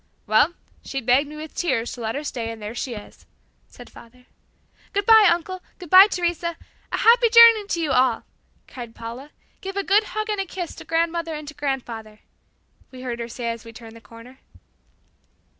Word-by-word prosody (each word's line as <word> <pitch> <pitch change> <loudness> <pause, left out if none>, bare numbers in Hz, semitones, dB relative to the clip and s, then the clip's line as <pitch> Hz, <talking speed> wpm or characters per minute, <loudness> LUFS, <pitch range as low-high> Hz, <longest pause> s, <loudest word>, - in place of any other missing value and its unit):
"Well, 220 +10 +3 0.3
she 270 - -4
begged 260 +4 +2
me 305 - -10
with 310 0 -9
tears 255 -9 -1
to 245 - -8
let 225 0 -3
her 290 - -4
stay 235 -6 -4
and 225 -1 -7
there 210 +1 -7
she 240 0 -5
is," 210 - -13 0.4
said - - -14
father. 250 +2 -17 0.7
"Good 405 -1 -1
bye, 440 -2 +7
uncle; 360 +2 -3 0.2
good 355 -4 -12
bye, 380 +2 +10
Teresa 345 -3 -2 0.3
A - - -1
happy 470 +1 +5
journey 460 -3 +7
to 340 - -2
you 315 -4 -1
all," 255 -3 +2 0.4
cried 235 -3 -10
Paula. 235 +5 -8 0.3
"Give 390 +1 -6
a 400 - 0
good 410 +3 +3
hug 430 +1 -4
and 415 -2 -1
a 390 - -5
kiss 355 -2 -6
to - - -10
grandmother 330 0 -1
and 300 -1 -8
to - - -10
grandfather," 240 -7 -5 0.7
we 255 -1 -12
heard 240 -2 -4
her 235 - -4
say 235 0 -4
as 230 -1 -8
we 230 - -11
turned 225 -1 -13
the 230 - -14
corner. 230 +4 -15
285 Hz, 195 wpm, -22 LUFS, 235-360 Hz, 0.7 s, bye